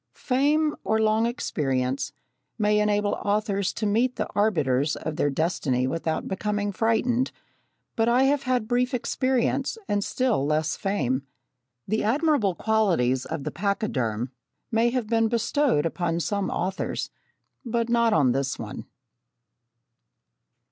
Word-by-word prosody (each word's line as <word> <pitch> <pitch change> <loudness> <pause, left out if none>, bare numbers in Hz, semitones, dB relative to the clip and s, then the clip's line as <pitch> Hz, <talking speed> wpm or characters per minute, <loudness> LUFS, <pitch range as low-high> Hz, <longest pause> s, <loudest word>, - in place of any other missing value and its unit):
Fame, 295 +4 +1
or 220 - +1
long 220 +1 +3
experience, 135 - -1 0.5
may 210 -1 +2
enable 205 -1 +1
authors 200 -1 0
to 215 - -3
meet 235 +5 +2
the 215 - -2
arbiters 150 -9 +1
of 160 - -5
their 145 - +1
destiny 135 -4 0
without 160 +3 -2
becoming 205 +1 -1
frightened, 230 +4 +1 0.6
but 225 0 +2
I 245 +2 +4
have 280 +1 +3
had 250 -4 0
brief 250 +1 +1
experience, 260 - 0
and 205 -1 0
still 250 - 0
less 150 +1 0
fame. 170 -10 -1 0.7
The 215 +3 0
admirable 245 - +2
qualities 170 - +1
of 160 -3 -4
the 150 - -3
pachyderm 130 - -1 0.4
may 230 +1 +3
have 250 -1 -1
been 225 +1 +2
bestowed 235 - +1
upon 170 0 -1
some 200 +2 -1
authors 190 +3 -2 0.5
but 235 -2 -1
not 235 -1 +3
on 145 -9 +4
this 135 +1 -1
one. - - -7
210 Hz, 130 wpm, -25 LUFS, 160-235 Hz, 0.7 s, I